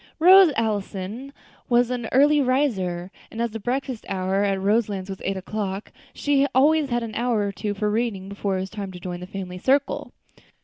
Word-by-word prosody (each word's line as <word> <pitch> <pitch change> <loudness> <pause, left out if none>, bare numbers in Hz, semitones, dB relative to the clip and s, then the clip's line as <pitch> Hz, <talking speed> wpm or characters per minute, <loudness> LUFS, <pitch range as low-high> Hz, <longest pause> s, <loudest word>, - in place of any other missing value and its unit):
Rose 365 +1 +8
Allison 215 +3 -3 0.4
was 245 0 +3
an 240 -2 -3
early 290 +3 +5
riser, 195 -10 0 0.2
and 225 - -9
as 235 -1 0
the 225 - -5
breakfast 255 +2 -3
hour 190 +1 0
at 195 -1 0
Roselands 200 -1 0
was 190 - -8
eight 195 0 -1
o'clock, 195 +1 -4 0.2
she 280 -1 +1
always 295 +2 +4
had 240 -1 0
an 225 -1 -6
hour 235 -1 0
or 200 -1 -1
two 205 +1 -4
for 210 +1 -1
reading 215 -4 -1
before 200 -1 -2
it - - -2
was 190 - -6
time 200 -3 -5
to 180 - -9
join 175 0 -5
the 180 - -8
family 185 -2 -6
circle. 275 +6 +1
215 Hz, 190 wpm, -24 LUFS, 195-255 Hz, 0.4 s, Rose